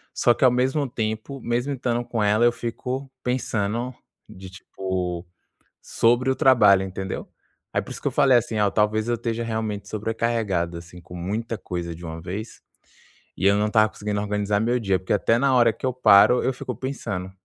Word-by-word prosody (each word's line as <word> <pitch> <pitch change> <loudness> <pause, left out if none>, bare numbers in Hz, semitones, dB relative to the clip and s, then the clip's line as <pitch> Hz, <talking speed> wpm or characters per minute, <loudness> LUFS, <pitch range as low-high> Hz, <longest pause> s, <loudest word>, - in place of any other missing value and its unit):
Só 120 - +4
que - - -3
ao 130 - +7
mesmo 130 +3 0
tempo, 110 +4 -4
mesmo 120 +4 -1
estando 120 -2 -1
com 120 -2 -3
ela, 105 +3 +3
eu 120 - +5
fico 125 +3 -5
pensando 120 -1 -2 0.3
de 95 0 -11
tipo, 90 -1 -4 0.6
sobre 120 +3 +2
o 130 - +2
trabalho, 105 -7 +5
entendeu? 95 0 -5 0.5
Aí - - +1
por - - -11
isso - - -8
que - - -2
eu - - 0
falei 130 -3 +5
assim: 115 -1 -2
"Olha, 105 -1 +3
talvez 110 +1 +1
eu 120 - +2
esteja 115 0 -3
realmente 110 -3 -3
sobrecarregado 110 -6 -1
assim, 85 +1 -12
com 85 +2 -12
muita 105 +6 -3
coisa 85 -2 -5
de 85 - -10
uma 80 0 -7
vez". 100 +6 -7 0.8
E - - -4
eu 100 - +5
não 105 - +1
estava 110 0 +3
conseguindo 105 -1 -4
organizar 105 0 0
meu 120 +2 +1
dia, 95 -4 +1
porque 95 - -3
até 115 +3 +2
na 135 +1 +2
hora 120 -2 +5
que - - -16
eu 130 - +1
paro, 125 -1 +6
eu 130 - +1
fico 125 0 -5
pensando. 110 -7 -5
110 Hz, 195 wpm, -24 LUFS, 95-120 Hz, 0.8 s, ao